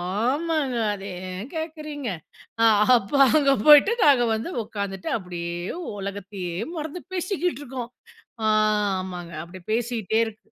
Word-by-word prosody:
ஆமாங்க. 260 - 0 0.2
அத 200 -1 -6 0.3
ஏன் 185 +6 -6
கேட்கிறீங்க. 305 -4 -5 0.5
அ - - +6 0.3
அப்போ 230 +4 -2 0.2
அங்க 280 -2 +4
போயிட்டு 300 +8 +8
நாங்க 275 -5 +5
வந்து 220 +10 -3
உட்கார்ந்துட்டு, 200 -3 -5
அப்பிடியே 175 -4 -5 0.4
உலகத்தையே 195 -2 -5 0.2
மறந்து 315 +2 -5
பேசிக்கிட்டு 360 -3 -1
இருக்கோம். 250 -3 -6 0.5
ஆ, - - +2 0.5
ஆமாங்க. 180 -2 -7
அப்டி 185 +2 -11
பேசீட்டே 225 -2 0
இருக் 220 -1 -9
230 Hz, 120 wpm, -24 LUFS, 195-295 Hz, 0.5 s, போயிட்டு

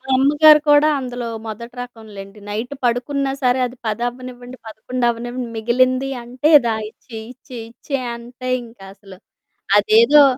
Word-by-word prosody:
అమ్మగారు 300 +3 +6
కూడా 295 +1 +6
అందులో 245 -2 -5 0.2
మొదటి 235 +3 -8
రకంలెండి. 210 -4 -11
నైట్ 225 +6 -4
పడుకున్నా 270 +3 0
సరే 250 +1 +3
అది 250 +1 -8
10 220 +3 -2
అవ్వనివ్వండి, 250 0 -9
11 240 +3 -3
అవ్వనివ్వండి 240 +1 -4
మిగిలింది 255 +4 +1
అంటే 255 +6 0
"దా 225 - +1
ఇచ్చెయి, 220 0 -11
ఇచ్చేయి, 245 -2 -10
ఇచ్చేయి" 270 +1 -4
అంతె 245 +2 -8
ఇంకా 225 -4 -14
అసలు. 195 -2 -15 0.6
అదేదో 235 +8 +6
245 Hz, 135 wpm, -19 LUFS, 225-255 Hz, 0.6 s, అమ్మగారు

